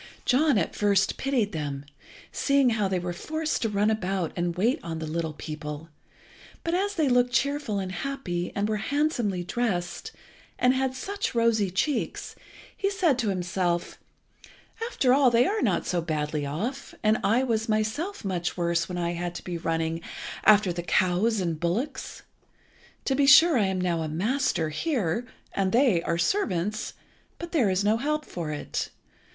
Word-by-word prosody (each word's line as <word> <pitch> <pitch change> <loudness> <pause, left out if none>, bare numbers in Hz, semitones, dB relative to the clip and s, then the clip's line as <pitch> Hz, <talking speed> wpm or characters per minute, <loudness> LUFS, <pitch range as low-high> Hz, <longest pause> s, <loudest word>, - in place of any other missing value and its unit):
John 280 0 +4
at 170 - -1
first 200 -2 +2
pitied 255 -7 0
them, 145 -4 -4 0.5
seeing 275 -3 +3
how 215 -3 +1
they 190 -1 0
were 175 0 -3
forced 315 - -2
to 225 - +1
run 210 +1 +2
about 190 -5 -1
and 175 -1 -1
wait 235 - +2
on 165 -2 -5
the 160 - -4
little 160 0 -2
people, 150 +1 -7 0.7
but 335 - -1
as 400 +3 0
they 315 -4 +2
looked 245 -1 +3
cheerful 280 -5 0
and 190 -1 -3
happy, 190 -8 -3
and 200 +1 0
were 215 0 0
handsomely 235 - 0
dressed, 185 - -2 0.5
and 250 +1 +4
had 260 0 0
such 395 +1 -3
rosy 230 -4 +3
cheeks, 260 +10 -2 0.4
he 395 - 0
said 355 -10 +2
to 225 -5 +1
himself 180 -2 -1 0.9
"After 255 - +3
all, 270 -1 +5
they 240 +1 +4
are 430 +1 0
not - - +1
so 175 -1 0
badly 150 -2 -2
off, 230 - -4
and 215 +1 +3
I 225 +6 +3
was 225 -3 -1
myself 220 - -1
much 175 -2 -2
worse 170 0 0
when 180 - -4
I 170 -1 -1
had 175 0 -4
to - - -7
be 175 -2 -4
running 165 0 -1 0.4
after 205 -4 +6
the 175 - -3
cows 185 +6 +2
and 170 -4 -2
bullocks. 220 - -3 0.8
To 270 - +1
be 275 +1 +3
sure 325 +3 +8
I 210 -5 +3
am 190 -1 -1
now 175 -2 0
a 160 - -2
master 180 - 0
here, 230 - -1 0.3
and 190 -1 0
they 235 -7 +4
are 170 0 -1
servants, 210 - -1 0.4
but 340 0 -7
there 260 - +3
is 185 +1 +1
no 215 +2 +3
help 300 +4 -1
for 170 -3 -5
it. 150 -1 -3
205 Hz, 170 wpm, -27 LUFS, 175-260 Hz, 0.9 s, sure